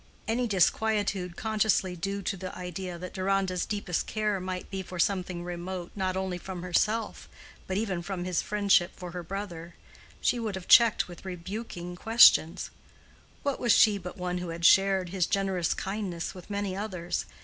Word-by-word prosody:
Any 240 +2 +1
disquietude 200 -2 +1
consciously 215 -4 +1
due 195 +3 -3
to 195 - -1
the 185 0 -7
idea 180 0 -5
that 180 +1 -8
Deronda's 190 -1 0
deepest 200 -4 -2
care 210 -2 0
might 185 0 -5
be 195 -1 -3
for 185 0 -8
something 180 -1 0
remote 175 0 -5
not 190 -2 -1
only 190 -2 -2
from 180 -1 -7
herself 215 +5 0 0.4
but 190 - -1
even 195 -5 -1
from 180 0 -4
his 180 -1 0
friendship 200 -3 +2
for 180 -1 -8
her 180 0 -5
brother, 175 -2 -6 0.4
she 245 - +1
would 220 -4 -3
have 190 -2 -7
checked 235 -3 +6
with 175 -2 -11
rebuking 180 -1 -6
questions:—What 225 - +2
was 240 -3 +4
she 210 -3 +5
but 180 +2 -8
one 180 0 -2
who 180 -1 -5
had 170 0 -3
shared 195 -1 +5
his 180 -1 0
generous 195 -4 0
kindness 190 -4 -4
with 180 0 -12
many 200 -2 -2
others? 185 -4 -3
190 Hz, 165 wpm, -28 LUFS, 180-205 Hz, 0.4 s, checked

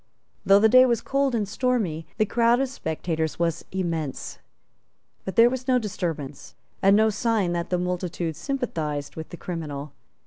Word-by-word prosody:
Though 195 +1 +6
the 215 +2 +5
day 255 +3 +7
was 235 -3 +2
cold 275 -2 0
and 210 -3 -1
stormy, 210 -8 -1
the 215 - +3
crowd 235 +2 +3
of 270 -1 0
spectators 160 - -3
was 170 -1 -1
immense; 165 -7 -3 0.9
but 190 - -5
there 230 +1 +7
was 255 +1 -3
no 255 -1 +4
disturbance, 165 - -4 0.3
and 195 +1 +5
no 220 0 +4
sign 215 -4 0
that 170 0 -3
the 180 - +1
multitude 175 -2 -3
sympathized 160 - -3
with 160 0 -7
the 175 - -9
criminal. 150 -5 -6
185 Hz, 165 wpm, -25 LUFS, 160-235 Hz, 0.9 s, day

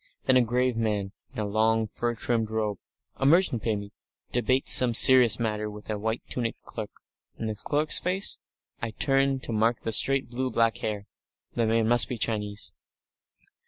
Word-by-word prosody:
Then 130 - +2
a 130 - +5
grave 125 +1 0
man 105 -3 -2 0.2
in 135 - -15
a 105 - -2
long, 110 +2 +1
fur 120 +2 -4
trimmed 115 -1 -2
robe, 110 -3 -3 0.4
a 135 - -2
merchant, 160 - +2
maybe, 105 -2 -3 0.4
debates 130 +2 +3
some 125 -2 +4
serious 125 -3 +7
matter 105 -2 -3
with 105 +1 -9
a 105 - -4
white 110 +2 -3
tunicked 115 -2 -5
clerk. - - -8 0.5
And 110 - -5
the 110 - -3
clerk's 150 +8 -1
face? 185 +2 0 0.4
I 120 - -3
turn 135 -1 +1
to - - -6
mark 115 +2 0
the 115 - -3
straight, 135 +3 +4
blue 130 +2 -4
black 115 -1 0
hair. 105 -2 -4 0.5
The 115 -1 -1
man 115 0 +1
must 120 -3 +5
be 125 - -4
Chinese.... 105 -2 -4
115 Hz, 175 wpm, -26 LUFS, 110-125 Hz, 0.5 s, serious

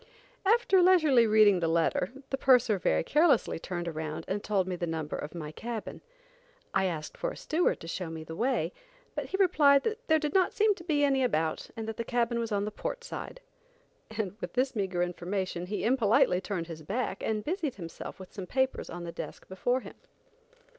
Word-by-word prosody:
After 410 -4 +4
leisurely 310 -10 +5
reading 210 -3 +6
the 165 - 0
letter, 165 +2 +1 0.2
the 270 - 0
purser 250 -7 +4
very 80 - +2
carelessly 300 - +3
turned 175 0 -4
around 155 -2 -4
and 205 +2 -2
told 195 -3 +1
me 185 - -2
the 175 0 -3
number 160 -2 -3
of 150 +3 -6
my 155 -3 -5
cabin. 225 +5 -6 0.7
I 190 - +2
asked 160 -4 -3
for - - -2
a - - -8
steward 335 +3 +1
to 165 - -8
show 170 0 -4
me 160 -1 -6
the 160 +1 -8
way, 245 +8 0 0.4
but - - -3
he 385 - -2
replied 295 -8 +5
that 450 +2 -3
there 315 - +5
did 300 -2 -2
not 375 -1 +3
seen 430 0 +3
to 355 - -12
be 300 -4 +1
any 270 -2 +3
about, 160 -10 0
that 225 -1 -5
the 230 - -2
cabin 235 0 0
was 230 -1 -3
on 205 0 0
the 210 - -3
port 475 - -5
side, - - -7 0.7
and 215 -3 -3
with - - -5
this 255 0 0
meagre 190 -4 0
information, 180 0 -3
he 210 - -3
impolitely 225 -6 +3
turned 190 -4 -3
his 165 -2 -8
back 215 +11 -3
and 215 -1 -1
busied 320 -5 -2
himself 170 -1 -8
with 185 - -11
some 190 -3 -6
papers 265 +3 0
on 175 0 -6
the 170 - -5
desk - - -8
before 245 +7 0
him. - - -10
215 Hz, 200 wpm, -29 LUFS, 175-275 Hz, 0.7 s, reading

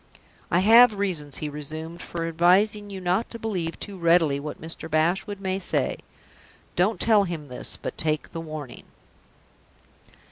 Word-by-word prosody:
"I 175 - +3
have 225 +2 +7
reasons," 170 -8 -1
he 155 - -4
resumed, 155 +3 -7
"for 165 -1 -4
advising 195 +5 +3
you 195 -1 -6
not 185 +5 0
to 230 - -8
believe 185 -7 -3
too 200 -2 -8
readily 165 -4 +3
what 150 +1 -7
Mr. 160 0 -5
Bashwood 175 +6 0
may 190 -1 -2
say. - - 0 0.8
Don't 200 +5 +1
tell 215 -3 +4
him 160 -5 -6
this, 125 - -1
but - - -6
take 155 -1 -1
the 165 - -5
warning." 155 -5 -8
175 Hz, 150 wpm, -25 LUFS, 155-200 Hz, 0.8 s, have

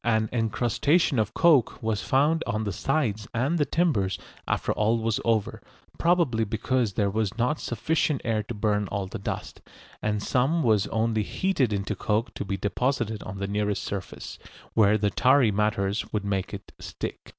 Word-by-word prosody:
An 110 -2 +1
encrustation 120 - +1
of 110 0 -1
coke 155 -8 +4
was 110 -2 0
found 150 +5 +2
on 110 +1 -1
the 100 - -2
sides 110 - -1
and 140 +9 +1
the 145 - +2
timbers 135 - +1 0.3
after - - 0
all 110 +2 +2
was 115 -1 0
over, 110 -3 0 0.4
probably 165 -10 +2
because 110 +1 0
there 100 -1 +1
was 110 0 -1
not 125 +6 +1
sufficient 150 +4 0
air 110 -2 +1
to 110 +3 -7
burn 105 -1 0
all 100 -1 -3
the 100 +4 -7
dust, 100 - -5 0.4
and 105 -1 -1
some 145 +7 +1
was 110 -4 +3
only 110 0 0
heated 140 - 0
into 100 0 -2
coke 110 +5 -1
to - - -4
be 95 -1 -3
deposited 110 +1 -1
on 95 +1 -7
the 100 - -2
nearest 105 -1 -1
surface, 100 -2 -6 0.3
where 105 -1 +4
the 105 -1 0
tarry 130 -3 +4
matters 105 0 0
would 105 -2 -2
make 95 -2 -1
it 100 -1 -8
stick. - - -6
110 Hz, 175 wpm, -26 LUFS, 105-125 Hz, 0.4 s, coke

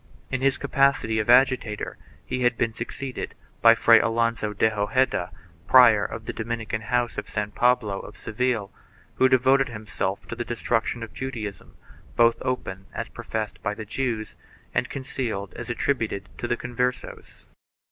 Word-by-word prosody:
In 130 -1 -1
his 135 0 +2
capacity 140 -5 +2
of 110 - -2
agitator 125 -4 +3 0.3
he 125 - -3
had 120 -1 +2
been 115 - 0
succeeded 125 +3 -6 0.3
by - - +8
Fray - - +6
Alonso 115 -2 0
de 110 +2 +2
Hojeda, 105 -1 +1 0.4
prior 120 -5 +7
of 115 +1 -5
the - - -4
Dominican 110 -1 -3
house 120 +2 0
of - - -8
San 105 -1 -2
Pablo 120 -4 +2
of - - -10
Seville, 115 -3 -1 0.5
who 130 - +5
devoted 130 +1 +4
himself 105 -3 -4
to - - -5
the 120 - -3
destruction 120 0 -1
of 115 - -9
Judaism, 115 -7 -6 0.4
both 115 0 +4
open 95 -7 -3
as - - -4
professed 110 -1 -5
by 105 -1 -2
the 110 - -7
Jews 115 -1 -3 0.4
and - - 0
concealed 120 -7 -4
as - - -7
attributed 115 -5 -1
to 120 - -2
the 120 0 0
Converses 125 +1 -4
115 Hz, 155 wpm, -25 LUFS, 110-125 Hz, 0.5 s, by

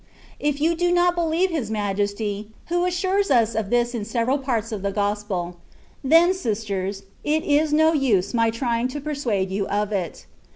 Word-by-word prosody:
^^ - - -32 0.4
If 295 -1 0
you 325 +3 +2
do 350 +1 +1
not 350 0 +3
believe 345 +2 +1
His 280 -10 -2
Majesty, 205 0 -2 0.2
who 350 +1 +1
assures 375 +3 0
us 230 -4 +3
of 215 -3 -2
this 240 +1 +1
in 230 -3 -3
several 235 +5 0
parts 235 -4 -2
of 210 -3 -4
the 200 0 -1
Gospel, 200 -4 -2 0.5
then, 330 +6 +5
sisters, 205 - -3 0.2
it 310 +1 +1
is 300 +1 +2
no 315 +2 +4
use 225 - +1
my 230 -1 +3
trying 235 +1 -1
to 255 +3 -5
persuade 250 -10 -2
you 195 +1 -1
of 205 +1 -1
it. 185 -5 -3
235 Hz, 180 wpm, -23 LUFS, 205-310 Hz, 0.5 s, then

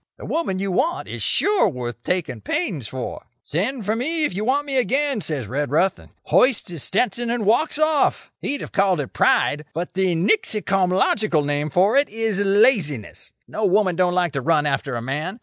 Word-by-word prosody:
The - - -10
woman 320 - -2
you 195 0 -2
want 335 - 0
is - - -6
sure 405 - +2
worth 120 - -6
taking 150 -11 -2
pains 150 - -3
for. 130 +2 -6 0.2
"'Send 210 - -2
for 215 +3 0
me 310 +6 0
if - - -2
you 200 +4 -3
want 275 +5 +1
me 275 -2 -1
again,' 270 -1 +1
says 145 -9 -3
Redruth, 145 - 0
and - - -17
hoists 250 -8 +2
his 165 -4 -5
Stetson, 240 - 0
and 235 -3 -1
walks 240 +9 +2
off. 310 -1 +1
He'd 285 - -3
have - - -7
called 190 -4 +2
it 140 - -5
pride, 150 +1 +2
but 175 +2 -4
the 185 -2 +1
nixycomlogical 195 -2 +1
name 145 +1 -1
for 190 - +3
it 285 - +3
is 220 -2 -2
laziness. 200 - +1 0.2
No 215 - -5
woman 195 -2 +2
don't 180 0 +1
like 175 -4 +1
to 135 - -2
run 150 +2 +2
after 135 -2 -1
a 115 - -4
man. 155 - -4
190 Hz, 190 wpm, -22 LUFS, 150-235 Hz, 0.2 s, for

